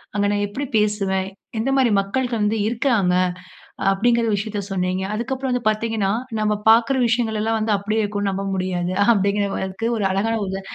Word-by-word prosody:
"அங்க 205 0 +1
நான் 205 0 0
எப்படி 280 +7 -4
பேசுவேன்? 195 -2 0 0.3
எந்த 270 +4 0
மாரி 255 -4 +3
மக்கள் 245 +6 -1
வந்து 210 +2 +1
இருக்காங்க?" 225 -6 +1 0.8
அப்டிங்கற 235 +4 +2
விஷயத்த 205 0 -2
சொன்னிங்க. 185 0 -1
அதுக்கு 240 +5 -3
அப்புறம் 265 0 -3
வந்து 250 -1 -1
பாத்தீங்கன்னா, 215 -2 0 0.3
நம்ம 215 0 +1 0.2
பாக்குற 230 +4 +5
விஷயங்களல்லாம் 225 -1 0
வந்து 215 0 0
அப்டியே 210 +2 -1
இருக்கும்னு 205 -1 -1
நம்ப 195 +1 -3
முடியாது. 185 -1 -2 0.2
அப்டிங்கறதுக்கு 200 0 -1
ஒரு 205 - -1
அழகான 215 +4 0
உதா 190 +1 -4
210 Hz, 155 wpm, -21 LUFS, 195-230 Hz, 0.8 s, பாக்குற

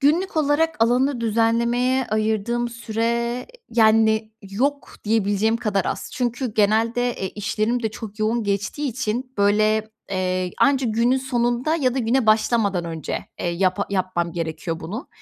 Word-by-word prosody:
günlük 320 +6 +2
olarak 310 +2 +2
alanı 250 +2 +1
düzenlemeye 235 +3 +1
ayırdığım 220 +2 0
süre, 235 +1 -2 0.2
yani, 220 -1 +3
yok 260 +9 -2
diyebileceğim 215 +1 +1
kadar 210 -5 -1
az. - - -4
Çünkü 245 -1 -2
genelde, 225 +4 +2
e, 190 -5 -4
işlerim 215 +4 -1
de 220 - 0
çok 215 -1 -9
yoğun 220 +2 +1
geçtiği 205 +9 -1
için 250 +1 -3
böyle, 215 +2 +3 0.2
eee, 185 -1 -1
anca 270 -3 +3
günün 230 +4 +2
sonunda 250 +3 0
ya 255 -6 +1
da 265 - -1
güne 240 +1 +1
başlamadan 215 -4 +2
önce, 165 -2 -5
eee, - - -2
yapa 185 +3 0
yapmam 185 -3 -1
gerekiyor 165 0 -4
bunu. 210 - -6
225 Hz, 140 wpm, -22 LUFS, 205-245 Hz, 0.2 s, yani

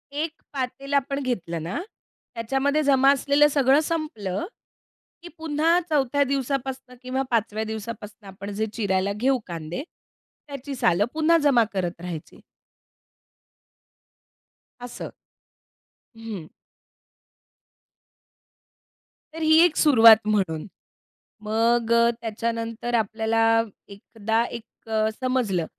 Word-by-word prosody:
1 300 +3 -2 0.2
पातेल 275 +1 -4
आपण 280 0 +1
घेतलं 175 -10 -3
ना, 175 - -3 0.6
त्याच्यामध्ये 270 +6 0
जमा 275 -1 +5
असलेलं 285 +1 +3
सगळं 275 -1 +3
संपलं 295 - -3 0.8
की 350 - -10
पुन्हा 320 +2 +2
4थ्या 285 -2 +2
दिवसापासनं 265 -1 -3
किंवा 255 +1 -2
5व्या 220 -1 0
दिवसापासनं 220 -1 -7
आपण 195 +1 -8
जे 215 +2 -1
चिरायला 200 -3 0
घेऊ 255 +4 +1
कांदे, 170 - -5 0.6
त्याची 280 -1 -7
सालं 185 -4 +2
पुन्हा 320 +2 +3
जमा 265 -5 +5
करत 175 -3 -3
राहायची. 175 -3 -8 2.4
असं. 245 0 -7 1.1
हं. 215 -8 -7 2.8
तर 325 - -7
ही 315 0 +5
एक 335 -3 +1
सुरुवात 230 -7 +7
म्हणून. 190 -7 0 0.8
मग 230 +2 +1 0.3
त्याच्यानंतर 230 +1 -3
आपल्याला 220 +1 0 0.4
एकदा 220 +3 -2
एक 225 0 -19 0.3
समजलं 245 -10 0
235 Hz, 95 wpm, -24 LUFS, 210-275 Hz, 2.8 s, सुरुवात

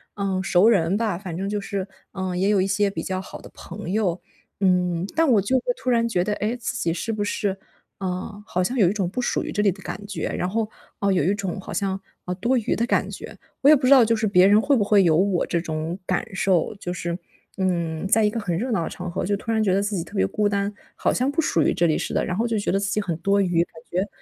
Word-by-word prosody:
嗯， 195 -2 -1
熟 190 +4 +4
人 185 -3 +3
吧。 215 -6 0
反 180 -4 -6
正 195 +1 -2
就 210 0 -1
是， 195 -1 -3 0.3
嗯， 185 -2 -3
也 190 +2 +1
有 205 -2 +3
一 190 - +1
些 200 +1 +2
比 165 -4 -5
较 185 0 -2
好 - - -10
的 - - -12
朋 190 0 -7
友。 195 -4 0 0.4
嗯， 180 -2 +2
但 325 -3 +4
我 205 - +4
就 260 +7 +1
会 - - -17
突 255 - -3
然 235 -1 +3
觉 180 -5 +1
得， 210 - -2
诶， 220 +4 -1
自 240 +1 -4
己 165 -5 0
是 225 +6 -3
不 205 -1 -1
是 200 -2 -1 0.4
啊， 190 +2 -4
好 180 +1 0
像 250 +7 -2
有 195 -6 +5
一 - - -1
种 190 -4 -1
不 250 +6 -3
属 - - 0
于 - - -5
这 210 - 0
里 205 - +4
的 195 +1 -11
感 205 +1 -6
觉。 205 - -3
然 180 - -2
后， 220 +1 -1 0.3
呃， 200 -1 +2
有 180 - +2
一 195 +5 +2
种 195 -2 -4
好 - - -8
像， 195 -2 -1 0.3
呃， 180 - -2
多 240 +7 +1
余 225 - 0
的 235 - 0
感 - - +1
觉。 - - -9 0.2
我 280 - +6
也 305 - +9
不 260 -2 -1
知 - - +3
道 255 -3 +8
就 230 +1 +2
是 220 0 -1
别 185 -1 +5
人 205 +1 +6
会 280 +2 +3
不 205 - +2
会 205 -1 +4
有 160 -3 +4
我 190 -1 +2
这 170 - 0
种 160 +2 -3
感 - - 0
受， 190 0 +1
就 180 - -4
是， 170 0 -3 0.4
嗯， 170 -3 -1
在 220 +2 +4
一 210 - +4
个 230 - -3
很 180 -5 -2
热 250 +6 -2
闹 180 -7 +1
的 - - -3
场 180 -1 -6
合 180 - -2
就 205 +1 +1
突 230 +2 -4
然 220 -1 +2
觉 190 -3 +2
得 195 - +2
自 205 0 -2
己 165 - -2
特 - - -13
别 95 - +3
孤 210 - 0
单， 200 0 0 0.2
好 - - +1
像 255 +2 +1
不 325 +3 +1
属 170 - +1
于 - - +2
这 175 - +2
里 155 - +2
似 - - -3
的， - - +1
然 180 +1 -2
后 235 +2 +1
就 225 -1 0
觉 - - -1
得 195 - +2
自 200 -1 -1
己 210 - +1
很 175 -5 -2
多 200 +3 +2
余， 175 -2 +2
感 - - -16 0.2
觉 185 +3 0
195 Hz, 305 characters per minute, -23 LUFS, 180-215 Hz, 0.4 s, 也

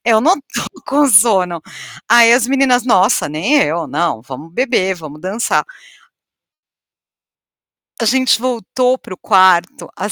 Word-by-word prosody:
Eu 225 -2 +3
não 345 +7 +3
tô - - -6 0.2
com 290 +1 +2
sono". 190 -6 +3 0.5
Aí 235 0 +6
as 240 -1 +2
meninas: 260 -2 +1
"Nossa, 200 -5 +2
nem 165 - -2
eu, 160 +2 -3
não, 145 -3 -3
vamos 135 +6 -11
beber, 235 -6 -1
vamos 155 -3 -12
dançar". 195 +6 -2 2.3
A 230 - -4
gente 255 0 +1
voltou 250 +1 -1
para 185 - -11
o - - -12
quarto 185 -3 +2
às 205 - -5
215 Hz, 135 wpm, -15 LUFS, 175-250 Hz, 2.3 s, Aí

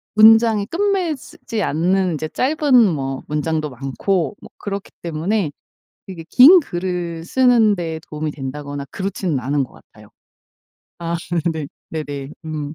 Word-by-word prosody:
문장이 220 -1 +6
끝매즈지 335 - -2
않는 180 +4 +1
인제 155 0 -3
짧은 290 - 0 0.2
뭐 135 -2 -4
문장도 150 0 -1
많고 160 - -2
뭐 - - -12
그렇기 200 -1 -5
때문에 170 +2 -1 0.6
이게 170 -4 -8
긴 315 +9 +9
글을 175 - -4
쓰는 235 -1 +4
데 165 -3 -4
도움이 150 0 -3
된다거나 140 +1 -6
그렇지는 190 -5 -2
않은 140 +3 0
것 130 - -10
같아요. - - -18 0.9
아 170 0 -2 0.4
네. 155 -2 -4 0.2
네네. 145 -3 -5 0.2
음. 150 -1 -4
170 Hz, 265 characters per minute, -20 LUFS, 150-215 Hz, 0.9 s, 긴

